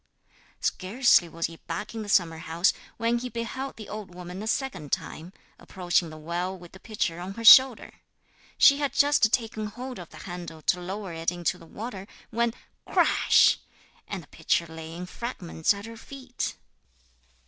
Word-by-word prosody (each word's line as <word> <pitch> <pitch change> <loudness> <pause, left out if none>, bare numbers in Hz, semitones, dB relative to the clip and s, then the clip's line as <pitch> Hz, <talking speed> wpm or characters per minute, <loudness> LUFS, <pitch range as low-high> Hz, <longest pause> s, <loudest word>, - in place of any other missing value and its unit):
Scarcely 195 -2 +3
was 165 0 -3
he 165 - -6
back - - -4
in 225 - -4
the 210 - -7
summer 165 -5 +2
house 170 +2 +1 0.2
when 230 +1 +1
he 250 +1 -5
beheld 245 +3 -5
the 215 - -9
old 205 -4 -8
woman 180 +1 -7
a 215 - -5
second 235 - -2
time, 165 +3 -3 0.3
approaching 175 -2 0
the 155 - -10
well 175 +4 -3
with 175 -1 -14
the 190 - -14
pitcher 200 -6 -2
on 185 +2 -6
her 230 - -6
shoulder. 260 +1 +8 0.6
She 280 - +7
had 285 -3 -1
just 285 -6 +4
taken 220 -3 -1
hold 250 +3 -7
of 175 - -9
the 155 - -13
handle 170 -2 -8
to 180 - +1
lower 190 0 -5
it 165 +1 -1
into 175 +1 -2
the 165 - -14
water, 200 0 -7 0.2
when 235 +1 0 0.3
crash! - - +4 0.5
And - - -5
the - - -19
pitcher 170 - 0
lay 160 0 -9
in 175 +2 -6
fragments 180 -6 -2
at 200 0 -2
her 230 0 -9
feet. 260 +1 -6
190 Hz, 175 wpm, -27 LUFS, 170-230 Hz, 0.6 s, shoulder